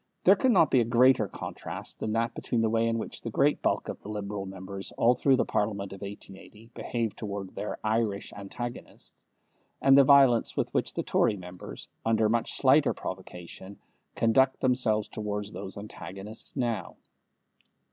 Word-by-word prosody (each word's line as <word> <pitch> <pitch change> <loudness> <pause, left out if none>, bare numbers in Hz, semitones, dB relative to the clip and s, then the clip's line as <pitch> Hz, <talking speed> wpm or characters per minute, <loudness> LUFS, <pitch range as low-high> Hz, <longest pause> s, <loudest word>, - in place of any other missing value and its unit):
There 195 - +7
could 260 - +2
not 165 - +4
be 130 - +5
a - - +4
greater 120 -1 +4
contrast - - -7
than 110 - -2
that 115 +1 0
between 120 - -1
the 110 -1 +1
way 115 0 +2
in 115 0 0
which 110 - -5
the 115 - -4
great 140 +6 +2
bulk - - 0
of - - -6
the - - -9
Liberal 100 -2 -4
members 95 +1 -7
all 120 +2 +5
through 135 +1 +3
the - - +1
Parliament 100 -2 -2
of 95 - -11
1880 105 +2 -11
behaved 115 -3 -3
towards 100 -3 -5
their 105 - -4
Irish 110 -2 -1
antagonists, 120 +5 -8 0.6
and 135 0 +6
the 140 - +8
violence 135 -4 +5
with - - -1
which - - -1
the - - -1
Tory 105 - +2
members, 90 -1 -9 0.2
under 110 -1 +2
much 115 +1 0
slighter 140 +2 +4
provocation, 95 +1 -8 0.4
conduct 130 +4 +3
themselves 125 -5 +1
towards 105 -1 -4
those 95 - -7
antagonists 100 0 -8
now. 120 -3 -2
110 Hz, 165 wpm, -28 LUFS, 100-120 Hz, 0.6 s, the